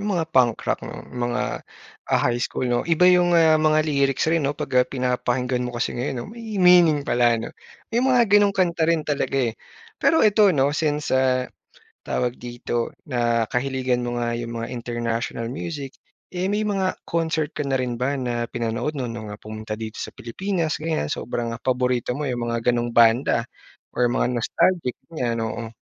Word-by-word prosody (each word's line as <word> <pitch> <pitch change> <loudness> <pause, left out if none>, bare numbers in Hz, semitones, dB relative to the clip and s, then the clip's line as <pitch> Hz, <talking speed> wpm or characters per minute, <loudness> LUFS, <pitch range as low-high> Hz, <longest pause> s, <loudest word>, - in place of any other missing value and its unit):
yung 205 - -3
mga 165 - +1
punk 125 -3 +4
rock - - -1
ng - - -9
mga, 120 -1 -2 0.5
ah, - - +3
high 120 0 +1
school 125 - -2
'no. 120 -1 +1
Iba 170 +1 +4
yung, 175 -1 +5
ah, 160 -1 +5
mga 155 0 +3
lyrics 140 -3 +1
rin 165 -2 +2
'no 145 - -3
'pag, - - -5
ah, 125 - +1
pinapakinggan 125 -1 -1
mo 125 -1 -4
kasi 120 - -1
ngayon 125 +2 -3
'no. - - -5
May 225 -3 -7
meaning 175 -5 +5
pala 120 -1 +3
'no. 115 - -6 0.4
May 235 - +2
mga 255 -1 +4
ganong 205 -1 +5
kanta 170 -3 +2
rin 165 -2 +2
talaga, 145 -2 -1 0.2
eh. - - -22 0.5
Pero 320 -7 +4
eto 210 -1 +5
'no 140 -3 +2
since, 150 -2 -1
ah, 130 -1 +2 0.6
tawag 125 0 -1
dito 120 -1 -4 0.2
nakahiligan 125 +1 0
mo 120 0 -3
nga 120 0 -1
yung 115 0 -5
mga 115 - -4
international 115 -1 -3
music, 145 -3 -5 0.4
eh, 185 +2 -1
may 210 +1 0
mga 195 -2 0
concert 160 -2 -1
ka - - -2
na 135 -1 0
rin 125 -1 -1
ba 130 +4 -1
na 120 -2 -2
pinanood 120 +6 -2
'no, 130 - -2
no'ng, 115 -2 -6
ah, 105 - -9
pumunta 110 0 -6
dito 110 -1 -6
sa - - -4
Pilipinas 165 - -3
ganyan? 160 - -1
Sobrang 115 -1 -3
paborito 125 0 0
mo 150 - -3
yung 120 -3 -2
mga 115 +1 +1
ganong 120 0 -1
banda 115 +1 +4 0.5
or 120 -1 +2
mga - - +1
nostalgic 170 -2 +1
ganyan? 125 -8 -2
Oo. 110 +1 -5
130 Hz, 185 wpm, -23 LUFS, 120-160 Hz, 0.6 s, yung